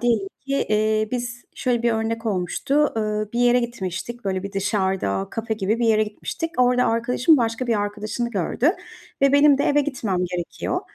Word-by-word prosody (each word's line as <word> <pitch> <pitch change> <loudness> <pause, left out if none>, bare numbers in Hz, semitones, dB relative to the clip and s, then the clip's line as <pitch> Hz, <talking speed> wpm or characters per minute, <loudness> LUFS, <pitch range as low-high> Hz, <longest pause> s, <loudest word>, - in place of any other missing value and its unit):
diyelim 225 -5 +1 0.2
ki, 275 - -3 0.2
eee, 215 0 +1
biz 240 -1 -4
şöyle 245 -3 0
bir 235 -1 +2
örnek 225 +1 -2
olmuştu. 220 - 0
Iıı, 215 -1 -1
bir 240 - -1
yere 245 0 +4
gitmiştik, 235 0 -5
böyle, 190 -1 -1
bir 200 0 -6
dışarıda 190 - 0
kafe 225 -1 -3
gibi 215 +2 -1
bir 235 - +1
yere 215 -1 +4
gitmiştik. 270 +10 -4
Orada 250 0 +4
arkadaşım 245 +6 +3
başka 230 +1 -1
bir 225 -3 +1
arkadaşını 215 +3 -3
gördü 235 - +1 0.5
ve 275 0 +5
benim 285 -1 +6
de - - +1
eve 290 0 +3
gitmem 240 -10 -2
gerekiyor. 175 -1 -3
225 Hz, 175 wpm, -23 LUFS, 205-245 Hz, 0.5 s, benim